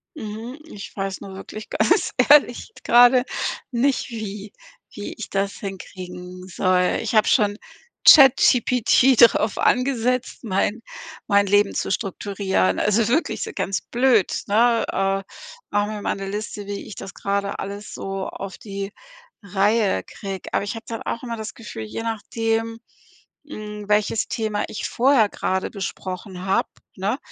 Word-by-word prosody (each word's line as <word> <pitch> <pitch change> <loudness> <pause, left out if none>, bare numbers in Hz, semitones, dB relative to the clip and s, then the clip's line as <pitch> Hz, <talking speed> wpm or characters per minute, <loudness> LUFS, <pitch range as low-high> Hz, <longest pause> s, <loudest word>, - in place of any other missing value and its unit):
Mhm. 230 +2 -7
Ich 205 -11 -10
weiß 195 -1 -4
nur 195 - -9
wirklich 215 +2 -9
ganz 215 - +2 0.2
ehrlich, 290 - +5
gerade 245 +1 +6 0.5
nicht 255 +2 +1
wie 210 -2 -6 0.4
wie 205 - -6
ich 225 - -8
das 195 0 0
hinkriegen 180 -2 -8
soll. 180 0 +1
Ich 225 0 -3
habe 215 - +5
schon 205 -3 +3 0.5
ChatGPT 255 -2 +6
drauf 230 -2 +5
angesetzt, 250 -1 0
mein 215 +2 -1 0.4
mein 200 -1 +3
Leben 205 0 +3
zu - - -2
strukturieren. 195 - -1
Also, 210 +1 +2
wirklich 295 +8 0
so - - -3
ganz 195 - -1
blöd, 240 -5 +2
ne, 230 +3 +3
äh: 195 0 0 0.5
„Mach 205 0 +1
mir 210 -1 -5
mal - - 0
'ne 195 0 -6
Liste, 205 0 -5
wie 200 0 -5
ich - - -9
das 195 - -8
gerade 200 0 -2
alles 200 +1 -6
so 195 0 -4
auf 195 -1 -7
die 195 -1 -6 0.5
Reihe 200 - +1
kriege.“ 195 -2 -7
Aber - - +1
ich 205 - -4
habe 225 - -9
dann 225 -1 -5
auch 235 - -4
immer 235 -2 -4
das 220 0 -6
Gefühl, 190 - -8
je 225 - -6
nachdem, 225 0 -2 0.7
hm, 210 -5 -8
welches 210 +1 +1
Thema 215 -2 -2
ich - - -4
vorher 250 -3 +3
gerade 190 -1 -2
besprochen 185 -2 -6
habe, 195 - +1 0.3
ne, 205 +7 -2
210 Hz, 145 wpm, -22 LUFS, 195-230 Hz, 0.7 s, gerade